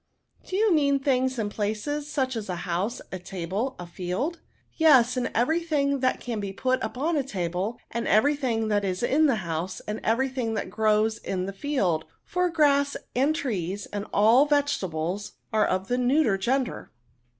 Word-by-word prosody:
'^ - - -17
Do 370 - -2
you 425 -1 +3
mean 280 -3 +3
things 260 -2 +1
and 210 -2 -2
places; 220 +9 -2
such 260 -4 -1
as 215 -3 -5
a 180 - -1
house, 185 +8 -2
a 185 - -4
table, 190 +8 -3
a 175 - -7
field?" 185 - -3 0.2
" - - -41
Yes, 265 -7 +5
and 250 -1 -1
every 305 +9 +2
thing 280 -4 0
that 255 0 +1
can 235 -3 -4
be 200 -1 -4
put 255 +6 0
upon 265 +9 -1
the 290 -4 +1
table, 190 -1 -3
and 235 0 -2
every 280 +8 +4
thing 230 -6 -1
that 205 -1 +1
is 185 +2 -2
in 300 +6 +4
the 270 - +3
house, 170 +3 -3
and 210 +1 -5
every 235 +5 +2
thing 250 -4 -2
that 190 - -3
grows 215 +1 +2
in 185 -1 -3
the 195 - -5
field; 195 - 0 0.2
for 360 0 0
grass, 285 -3 +3 0.2
and 280 +5 +2
trees, 205 - -3
and 205 0 -3
all 230 +8 +5
vegetables, 205 - -1 0.2
are 215 -1 +3
of 185 +1 -1
the 245 +1 0
neuter 250 -3 +3
gender." 250 +6 -1
235 Hz, 190 wpm, -26 LUFS, 200-280 Hz, 0.2 s, Yes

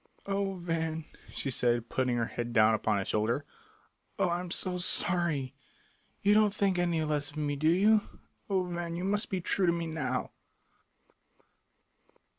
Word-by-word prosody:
"Oh, 195 -1 -1
Van," 165 -2 -2 0.3
she 135 - -3
said, 120 -1 +1
putting 125 -2 0
her 115 - +1
head 120 +1 -5
down 110 -1 +5
upon 110 -1 +1
his 95 - -2
shoulder, 115 +7 0 0.7
"oh, - - +2
I 170 0 0
am 180 0 -6
so 180 +1 -1
sorry. 170 -7 +1 0.7
You 205 +1 +5
don't 210 -1 +5
think 195 -3 +1
any 170 -2 +1
less 150 -1 0
of 155 - -12
me, 145 -1 -1
do 155 +3 +2
you? 210 +5 +5 0.5
Oh, 190 -2 +2
Van, 175 -1 -4
you 175 - -4
must 205 +2 0
be 190 -2 -2
true 185 +2 +1
to - - +5
me 170 0 -2
now!" 135 -6 -2
165 Hz, 165 wpm, -30 LUFS, 130-180 Hz, 0.7 s, down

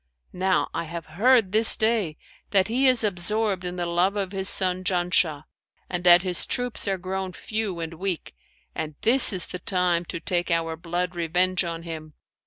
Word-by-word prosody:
Now 185 +1 0
I 165 - -3
have 165 0 -7 0.2
heard 240 -6 +4
this 220 +2 +8
day 220 -8 0 0.3
that 195 0 +2
he 260 +4 +2
is 255 -3 +3
absorbed 205 0 -2
in 180 0 -4
the 175 -1 -3
love 175 +4 0
of 195 -2 -3
his 195 -1 +1
son 185 -1 +1
Janshah, 175 -5 +1 0.5
and 180 -1 -3
that 175 0 +7
his 180 -2 -1
troops 245 -4 -1
are 195 -1 0
grown 185 0 -5
few 215 -2 -4
and 165 0 -5
weak; 180 0 -4 0.4
and 155 -1 -5
this 255 +3 +4
is 185 -3 0
the 180 - -8
time 175 -1 0
to 170 - -6
take 175 +2 -2
our 165 -1 -1
blood 175 +2 -4
revenge 180 +2 0
on 165 -1 -5
him. 155 -2 -8
180 Hz, 185 wpm, -24 LUFS, 170-195 Hz, 0.5 s, this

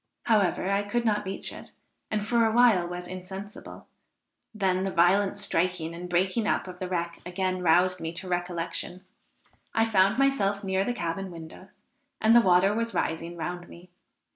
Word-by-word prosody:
However, 200 -4 +2
I 200 0 +2
could 235 +4 -2
not 210 -2 +1
reach 195 +1 -4
it, - - -11 0.4
and 210 -1 -1
for 235 +1 +2
a 225 - +3
while 225 -7 +4
was 180 0 -6
insensible; 190 +3 -9 0.7
then 190 -4 0
the 195 - -1
violent 190 +3 +3
striking 180 -4 -1
and 175 +1 -7
breaking 185 +5 +1
up - - 0
of 180 -1 -9
the 185 - -4
wreck 170 -1 -3
again 185 +1 -2
roused 180 +2 +3
me 160 0 -3
to 180 +2 -5
recollection; 175 +1 -4 0.7
I 225 - +4
found 200 -1 +3
myself 215 -8 +1
near 190 0 0
the 245 +4 -2
cabin 190 0 -3
windows, 170 +2 -12 0.4
and 220 +1 +4
the 235 - +8
water 190 0 +4
was 230 +1 -2
rising 165 +1 -2
round 175 +2 -5
me. 175 +1 -14
185 Hz, 170 wpm, -27 LUFS, 175-205 Hz, 0.7 s, the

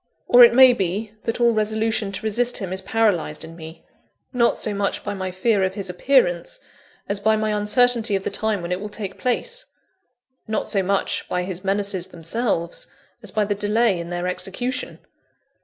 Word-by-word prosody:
Or 245 0 +8
it 235 0 +6
may 260 -1 +8
be, 200 +1 -3
that 230 +1 -2
all 235 -1 +4
resolution 220 -1 0
to - - -5
resist 240 +3 +3
him 190 -5 -4
is 190 - -1
paralysed 190 -7 0
in 165 +1 -12
me, 160 0 -11 0.5
not 235 -1 +2
so 215 - 0
much 200 0 -2
by 205 - -3
my 185 -1 -4
fear 195 +2 +1
of 190 0 -1
his 190 -3 -4
appearance, 180 -4 +1 0.5
as 200 0 -2
by 220 +2 +2
my 215 0 -1
uncertainty 225 +1 +3
of 195 - -2
the - - -3
time 210 -2 -2
when 170 - -5
it 180 - -1
will 210 - -5
take 205 -2 -7
place 475 - -2 0.8
not 220 - -2
so 195 - +1
much 195 +1 -1
by 180 - -1
his 185 0 -5
menaces 195 -2 -1
themselves, 170 0 -2 0.3
as 215 - -5
by 210 +2 0
the 205 - -1
delay 210 -1 +1
in 170 0 -6
their 175 0 -3
execution. 245 +8 -3
205 Hz, 190 wpm, -22 LUFS, 185-225 Hz, 0.8 s, Or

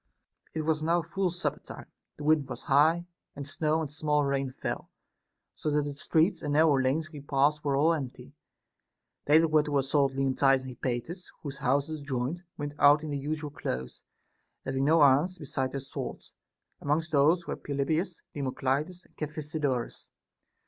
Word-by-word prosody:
30. - - -1
It - - -1
was 155 0 +1
now 165 +2 +2
full 185 +3 -1
supper 175 +1 -3
time, - - -10 0.3
the 145 - -8
wind 150 -3 +2
was - - -6
high, 155 +5 +4 0.3
and 140 0 -6
snow 155 +2 0
and 150 -3 -4
small 150 -1 +1
rain 135 -1 -1
fell, - - -5 0.6
so - - -3
that 150 0 +2
the 145 - -3
streets 160 +5 +1
and 145 - -2
nar 155 +2 +5
row 155 - +4
lanes 155 +5 0
we 145 -3 -8
passed 145 +2 +1
were 140 -2 +1
all 155 +4 +4
empty. 135 -6 -6 0.9
They 150 +2 +6
that 165 0 +4
were 155 -1 +5
to 150 -1 -1
assault 135 0 +2
Leontidas 135 0 +2
and 130 -1 -8
Hypates, 130 +10 -4
whose 140 -2 -5
houses 145 +2 0
joined, 140 +4 -3 0.2
went 145 -1 -4
out 145 +2 +6
in 155 - -4
their 140 - -2
usual 150 +1 -3
clothes, 65 - -5 0.6
having 135 0 0
no 160 +1 +5
arras 145 +7 +4
besides 135 -3 -3
their 140 - -2
swords; 135 - -7 0.5
amongst 155 +3 0
those 160 +4 +4
were - - -3
Pelopidas, 155 +5 -2
Democlides, 140 +5 -2
and - - -27
Cephisodorus. 150 -4 -3
145 Hz, 175 wpm, -29 LUFS, 135-155 Hz, 0.9 s, They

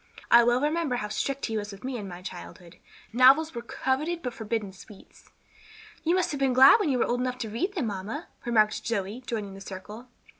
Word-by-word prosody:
"I 235 0 +8
well 240 +1 +3
remember 300 -1 0
how 210 -3 -3
strict 275 +6 -2
he 225 -2 -2
was 205 0 -4
with 195 +3 -12
me 260 0 -4
in 210 -4 -5
my 180 0 -9
childhood; 175 -1 -10 0.4
novels 270 +6 +5
were 235 - -5
coveted 295 +8 -2
but 250 - -3
forbidden 220 -3 -4
sweets." 195 +1 -16 0.7
"You 335 +2 +2
must 370 -2 +1
have 285 - -4
been 270 -2 +2
glad 265 - +8
when 405 - 0
you 260 - +1
were - - +2
old 245 +1 -1
enough 250 0 -2
to 230 -3 -5
read 365 - -2
them, 310 -9 -1
mamma," 205 0 -5 0.2
remarked 215 -3 +2
Zoe, 210 +1 -3
joining 210 -4 -4
the 195 - -11
circle. 205 +5 -9
235 Hz, 215 wpm, -27 LUFS, 210-270 Hz, 0.7 s, I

